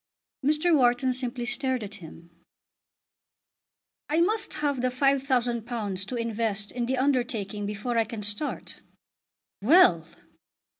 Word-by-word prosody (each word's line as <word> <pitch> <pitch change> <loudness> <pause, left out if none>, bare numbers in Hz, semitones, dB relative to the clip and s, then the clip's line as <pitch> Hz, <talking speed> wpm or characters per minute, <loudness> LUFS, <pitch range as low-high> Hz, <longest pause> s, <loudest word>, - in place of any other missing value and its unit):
Mr. 310 +4 +3
Wharton 255 -1 +3
simply 245 -1 -4
stared 255 0 -1
at 205 - -8
him. 165 +1 -13 1.8
"I 310 +2 +2
must 425 +6 +1
have 285 -4 -1
the 255 - +1
£5000 245 -6 0
to 250 - -4
invest 225 -3 -2
in 240 -1 -3
the 260 +1 0
undertaking 235 -7 -1
before 215 +3 -2
I 225 - +2
can 220 -2 -7
start." 210 +9 -4 0.8
"Well!" 205 - +5
245 Hz, 115 wpm, -27 LUFS, 210-270 Hz, 1.8 s, Well